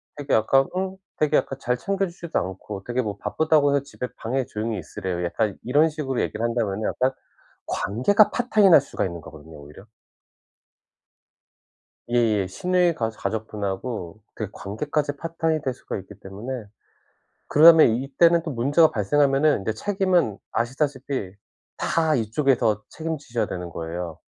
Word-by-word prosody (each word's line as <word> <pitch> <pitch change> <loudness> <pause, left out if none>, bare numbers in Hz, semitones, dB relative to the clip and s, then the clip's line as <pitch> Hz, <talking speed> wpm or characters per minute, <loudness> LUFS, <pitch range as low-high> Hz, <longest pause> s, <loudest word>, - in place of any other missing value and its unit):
되게 145 -1 -3
약간 135 +5 +3
응 190 0 -2 0.2
되게 155 -1 +3
약간 135 - -2
"잘 125 - 0
챙겨 195 +8 -1
주지도 170 -1 -5
않고 95 +1 -4
되게 120 +3 -1
뭐 105 -4 -4
바쁘다고 155 +2 +2
해서 140 - +2
집에 125 -2 -6
방에 130 +3 -2
조용히 110 0 -3
있으래요." 90 -2 -4
약간 105 +4 -1
이런 145 +6 +3
식으로 145 -5 -2
얘기를 115 - -2
한다면은 110 -3 -1
약간 130 +1 +1 0.6
관계가 200 - +2
파탄이 215 -5 +3
날 160 - +9
수가 140 - -3
있는 85 -3 -4
거거든요 80 0 -13
오히려. 75 +6 -13 2.3
예예. 110 -5 +2
시누이 180 - +1
가 115 -4 -1
가족분하고 105 -2 -4
그 110 -3 -5
관계까지 145 +9 -3
파탄이 165 0 -1
될 130 - -2
수가 - - -6
있기 95 - -12
때문에 110 +5 -7 0.8
그다음에 160 +1 +8
이때는 135 +8 +3
또 165 - -5
문제가 145 +6 +3
발생하면은 140 +3 +2
이제 110 - -1
책임은 180 - 0
아시다시피 130 -3 -2 0.4
다 160 -2 +1
이쪽에서 115 -2 +1
책임지셔야 150 -7 -3
되는 90 -1 -6
거예요. 85 0 -5
125 Hz, 345 characters per minute, -24 LUFS, 105-155 Hz, 2.3 s, 날